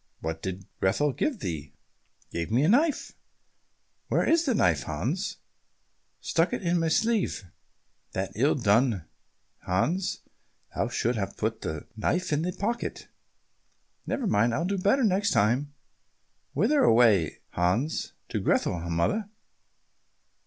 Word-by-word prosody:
"What 80 0 -4
did 95 0 -5
Grethel 140 +9 +2
give 265 - -1
thee?" 75 -4 -5 0.6
"Gave 85 0 -3
me 120 +5 +2
a 155 - +3
knife." 290 +7 +2 0.9
"Where - - +1
is 330 +1 +3
the 260 -5 +2
knife, - - +3
Hans?" - - -3 0.8
"Stuck 165 +2 +1
in 175 -2 0
my 165 - +1
sleeve." 220 - +1 0.7
"That's 95 0 -3
ill 135 +8 +3
done, 110 - +2 0.5
Hans, 160 - -1 0.5
thou - - 0
shouldst 120 -1 -1
have 95 - -4
put - - -2
the 80 -1 -4
knife 170 +10 0
in 150 - +1
thy 175 - -1
pocket." 210 +6 -3 1.0
"Never 265 - -1
mind, 115 - +2
will 165 +7 0
do 195 +1 -1
better 205 +8 +3
next 200 -1 +2
time." 125 +8 +2 0.8
"Whither 295 -1 +3
away, 110 - +4
Hans?" 100 - 0 0.2
"To - - -1
Grethel, 90 - +1
mother." 195 - 0
145 Hz, 130 wpm, -27 LUFS, -, 1.0 s, away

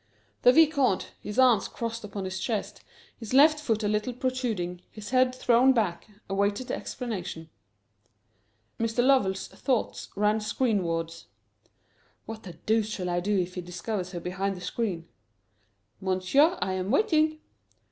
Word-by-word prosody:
The 250 - +7
Vicomte, 280 - +3
his 210 - -6
arms 250 -5 +5
crossed 230 -1 -5
upon 200 -1 -5
his 185 0 -4
chest, 215 +1 -3 0.4
his 230 +2 -4
left 305 +2 +6
foot 225 -7 -1
a - - +1
little 210 +4 -1
protruding, 235 -9 -2
his 210 0 -9
head 255 0 +3
thrown 255 +1 +4
back, 210 -8 -1 0.2
awaited 200 +5 -1
the - - 0
explanation. 180 -9 -6 1.3
Mr. 230 +2 +1
Lovell's 195 -8 +2
thoughts 255 -5 -2
ran 210 +2 +2
screenwards. 170 -8 -1 1.0
"What 220 0 -7
the 180 - -9
deuce 220 +2 0
shall 180 -4 -3
I 175 - +1
do 200 +3 0
if 180 -1 -1
he 180 - -4
discovers 180 +2 -4
her 175 - -3
behind 190 +2 -3
the - - -10
screen?" 180 -3 -3 0.9
"Monsieur, 190 - +3
I 190 - -1
am 185 +1 -3
waiting." 310 - +2
210 Hz, 145 wpm, -27 LUFS, 185-250 Hz, 1.3 s, The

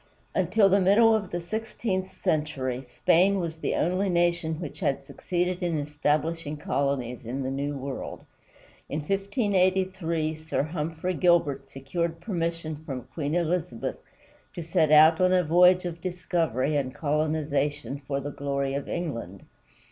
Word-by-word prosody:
Until 195 +3 +3
the 195 +1 +4
middle 220 +5 +6
of 210 -3 0
the 175 - -3
sixteenth 190 0 -3
century, 135 -5 -1
Spain 180 +9 +3
was 165 -2 -3
the - - -1
only 185 +4 +1
nation 170 -2 +1
which 160 -5 -7
had 135 0 0
succeeded 180 +4 -2
in 170 -3 0
establishing 150 +1 -1
colonies 140 -4 -1
in 130 +4 -4
the 130 - -2
New 140 +1 -2
World. 135 0 -6 0.6
In 150 - -2
1583 185 - 0
Sir 155 -2 -2
Humphrey 160 +3 -3
Gilbert 155 -6 +2
secured 165 +5 -3
permission 165 -4 -3
from 135 -6 -5
Queen 150 0 -2
Elizabeth 170 -8 -1 0.6
to 170 - -4
set 160 -1 +2
out 155 +2 +7
on 185 0 +4
a 180 -1 +4
voyage 180 +3 +5
of 170 -1 -5
discovery 165 -7 -1
and 135 -3 -1
colonization, 145 -2 -1
for 140 -1 -1
the 145 +1 -5
glory 140 -1 -2
of 140 0 -4
England. 115 - -4
160 Hz, 140 wpm, -27 LUFS, 145-180 Hz, 0.6 s, out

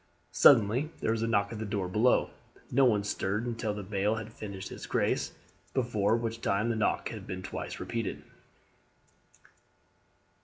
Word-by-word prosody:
Suddenly 125 +3 +5
there - - 0
was 115 0 -1
a 115 - 0
knock 100 -2 +1
at 110 - -6
the - - -2
door 100 -2 -2
below. 110 +7 +3 0.4
No 135 +2 +5
one 105 -5 +3
stirred 105 +2 -1
until 115 -2 -2
the 105 - -5
bailie 100 +3 0
had 110 +1 -12
finished 100 -4 -7
his - - -8
grace, - - 0 0.4
before 115 -4 +2
which 115 0 -3
time 110 +3 +1
the 115 - +1
knock 110 - 0
had - - -8
been 95 0 -5
twice - - -5
repeated. 115 -3 -3
110 Hz, 160 wpm, -30 LUFS, 100-115 Hz, 0.4 s, Suddenly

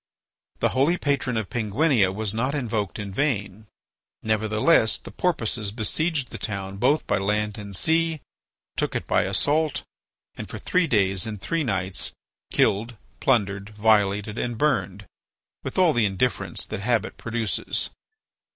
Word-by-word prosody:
The - - +3
holy 145 +7 +2
patron 140 -6 0
of 110 -3 -3
Penguinia 115 - +2
was 105 +1 -1
not 130 +6 0
invoked 110 -7 -2
in 100 -2 -5
vain. 105 -5 -1 0.6
Nevertheless, 110 +3 +3
the - - -11
Porpoises 115 - 0
besieged 135 +6 -1
the - - -7
town 100 -2 -4
both 135 +8 +2
by 100 - +1
land 105 +1 -1
and 100 -1 -5
sea, 160 - +2 0.6
took - - -1
it - - -2
by - - +2
assault, 145 +10 +1 0.5
and - - -8
for - - -6
three 180 -2 +1
days 95 - +2
and 105 -2 -5
three 160 - -1
nights 95 -6 -2 0.4
killed, 110 +3 +1 0.2
plundered, 100 -5 +1
violated, 105 0 +2
and 120 -2 -2
burned, 105 -8 0 0.6
with - - -5
all 180 -4 +5
the 120 -4 +3
indifference 100 +6 0
that - - -5
habit 110 0 0
produces. 115 -1 -1
110 Hz, 140 wpm, -25 LUFS, 100-135 Hz, 0.6 s, all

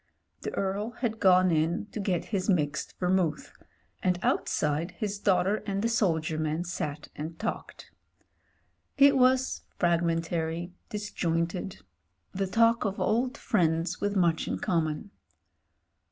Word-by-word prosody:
The - - -4
Earl 200 +3 -1
had 225 -3 -1
gone 185 -1 +5
in 165 +4 +1
to - - -5
get 190 -4 -1
his 190 0 0
mixed 150 -5 0
Ver 180 - 0
mouth, 180 -5 0 0.5
and 180 -1 +1
outside 150 +4 0
his 205 -3 -3
daughter 200 +1 +2
and 200 0 -1
the - - +3
soldier 160 -8 +1
man 155 +2 -1
sat 155 -4 -4
and 160 +2 -6
talked. 220 +4 -5 1.1
It 280 0 +7
was 260 0 +3 0.2
fragmentary, 170 0 0 0.2
disjointed 180 -3 -2 0.2
— 85 0 -46
the 195 0 -1
talk 230 +3 +3
of 200 -1 -2
old 245 +3 +1
friends 165 0 0
with 205 0 0
much 170 -4 +2
in - - -1
common. 165 +3 -1
180 Hz, 135 wpm, -28 LUFS, 165-205 Hz, 1.1 s, It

